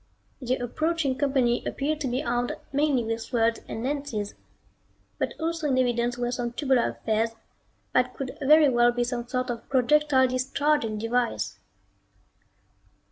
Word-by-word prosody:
The 255 Hz, 0 st, 0 dB
approaching 285 Hz, +3 st, -1 dB
company 260 Hz, -4 st, +1 dB
appeared 300 Hz, +2 st, -2 dB
to 275 Hz, -, -1 dB
be 255 Hz, +3 st, -1 dB
armed 240 Hz, -2 st, -1 dB, 0.2 s
mainly 285 Hz, -3 st, +2 dB
with 225 Hz, 0 st, -2 dB
swords 230 Hz, -1 st, +1 dB
and 225 Hz, -, -5 dB
lances, 265 Hz, -7 st, -3 dB, 0.9 s
but -, -, -2 dB
also 330 Hz, -1 st, -1 dB
in 265 Hz, -2 st, +1 dB
evidence 240 Hz, -1 st, +1 dB
were 245 Hz, 0 st, -1 dB
some 245 Hz, -1 st, -3 dB
tubular 260 Hz, -2 st, +2 dB
affairs 225 Hz, +1 st, -1 dB, 0.6 s
that 250 Hz, 0 st, +2 dB
could 270 Hz, 0 st, -5 dB
very 300 Hz, +2 st, +6 dB
well 240 Hz, -2 st, +4 dB
be 240 Hz, 0 st, 0 dB
some 240 Hz, 0 st, -3 dB
sort 255 Hz, 0 st, -1 dB
of 235 Hz, -1 st, -8 dB
projectile 265 Hz, +1 st, +4 dB
discharging 255 Hz, -2 st, 0 dB
device. 235 Hz, +2 st, -1 dB
250 Hz, 140 wpm, -26 LUFS, 240-280 Hz, 0.9 s, very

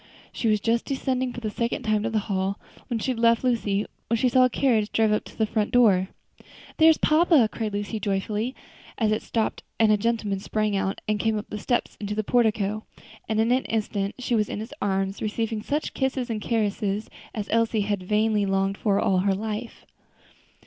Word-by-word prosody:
She 230 Hz, -, -1 dB
was 215 Hz, -1 st, +3 dB
just 230 Hz, +3 st, 0 dB
descending 260 Hz, -2 st, -1 dB
for 245 Hz, -, -7 dB
the 215 Hz, -2 st, -3 dB
second 235 Hz, +2 st, -2 dB
time 215 Hz, -1 st, +1 dB
to 225 Hz, -, -1 dB
the 220 Hz, -, -1 dB
hall, 195 Hz, -1 st, -1 dB, 0.3 s
where 235 Hz, -2 st, -2 dB
she 260 Hz, -, -1 dB
had 240 Hz, -, -4 dB
left 230 Hz, 0 st, +4 dB
Lucy, 215 Hz, -5 st, +1 dB, 0.2 s
when 230 Hz, 0 st, +1 dB
they 255 Hz, -, +3 dB
saw 255 Hz, +1 st, +5 dB
a -, -, +2 dB
carriage 225 Hz, -5 st, +1 dB
drive 220 Hz, -1 st, +2 dB
up 210 Hz, -, 0 dB
to -, -, -13 dB
the 220 Hz, -, +2 dB
front 210 Hz, 0 st, -1 dB
door. 205 Hz, -7 st, +4 dB, 0.7 s
"There's 320 Hz, 0 st, +6 dB
papa!" 310 Hz, -6 st, +4 dB
cried 220 Hz, -3 st, -3 dB
Lucy, 205 Hz, +2 st, -3 dB
joyfully, 210 Hz, +5 st, -2 dB, 0.4 s
as 220 Hz, -2 st, +1 dB
it 215 Hz, -, 0 dB
stopped 225 Hz, -2 st, -2 dB, 0.2 s
and 220 Hz, -1 st, +5 dB
a 210 Hz, -, +4 dB
gentleman 215 Hz, -2 st, -1 dB
sprang 215 Hz, +1 st, -1 dB
out 195 Hz, 0 st, -1 dB
and 210 Hz, -1 st, 0 dB
came 220 Hz, 0 st, +1 dB
up 210 Hz, -, -6 dB
the 210 Hz, -, -4 dB
steps 240 Hz, +3 st, -1 dB
into 210 Hz, 0 st, -3 dB
the 215 Hz, -, 0 dB
portico; 215 Hz, -2 st, +1 dB, 0.5 s
and 220 Hz, 0 st, +1 dB
in 225 Hz, +2 st, +2 dB
an 255 Hz, +1 st, +2 dB
instant 205 Hz, -2 st, -2 dB
she 250 Hz, -1 st, -3 dB
was 215 Hz, -3 st, +2 dB
in -, -, -4 dB
his 225 Hz, +6 st, -7 dB
arms, 195 Hz, 0 st, -1 dB
receiving 220 Hz, 0 st, -2 dB
such 295 Hz, +7 st, -2 dB
kisses 265 Hz, -2 st, -1 dB
and 215 Hz, -2 st, -3 dB
caresses 210 Hz, -2 st, -1 dB, 0.3 s
as 210 Hz, -2 st, -3 dB
Elsie 230 Hz, -1 st, +2 dB
had 205 Hz, -1 st, -1 dB
vainly 210 Hz, +1 st, +1 dB
longed 195 Hz, 0 st, 0 dB
for 200 Hz, -2 st, +2 dB
all 185 Hz, -1 st, +2 dB
her 195 Hz, +1 st, +2 dB
life. 220 Hz, +3 st, -5 dB
215 Hz, 205 wpm, -25 LUFS, 205-235 Hz, 0.7 s, There's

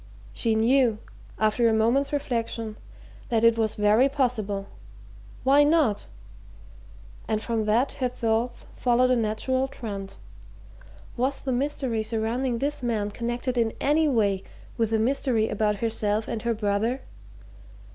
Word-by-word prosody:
She 225 Hz, -2 st, 0 dB
knew, 235 Hz, 0 st, +3 dB, 0.4 s
after 220 Hz, +2 st, +2 dB
a -, -, +2 dB
moment's 235 Hz, +6 st, +2 dB
reflection, 230 Hz, -5 st, -2 dB, 0.5 s
that 225 Hz, -1 st, +1 dB
it 230 Hz, 0 st, +6 dB
was 220 Hz, -2 st, 0 dB
very 215 Hz, +6 st, +4 dB
possible 225 Hz, -8 st, -1 dB, 0.8 s
why 275 Hz, +2 st, +5 dB
not? 290 Hz, -9 st, +2 dB, 1.2 s
And 215 Hz, -1 st, 0 dB
from 225 Hz, -1 st, -2 dB
that 230 Hz, +6 st, +2 dB
her 255 Hz, -2 st, -2 dB
thoughts 235 Hz, 0 st, -1 dB
followed 250 Hz, +1 st, +2 dB
a -, -, +4 dB
natural 245 Hz, +4 st, 0 dB
trend 200 Hz, -7 st, -7 dB, 1.0 s
was 265 Hz, +3 st, 0 dB
the 265 Hz, -, -3 dB
mystery 260 Hz, -3 st, -1 dB
surrounding 230 Hz, +3 st, -1 dB
this 285 Hz, +4 st, -2 dB
man 220 Hz, -4 st, -1 dB
connected 240 Hz, +3 st, -2 dB
in 225 Hz, -1 st, +1 dB
any 305 Hz, +2 st, +2 dB
way 205 Hz, -8 st, +1 dB, 0.3 s
with 225 Hz, -2 st, 0 dB
the 225 Hz, -, +1 dB
mystery 230 Hz, -1 st, +1 dB
about 210 Hz, 0 st, 0 dB
herself 215 Hz, 0 st, -1 dB
and 225 Hz, -, -3 dB
her 235 Hz, 0 st, 0 dB
brother? 215 Hz, +5 st, -1 dB
230 Hz, 135 wpm, -26 LUFS, 220-260 Hz, 1.2 s, it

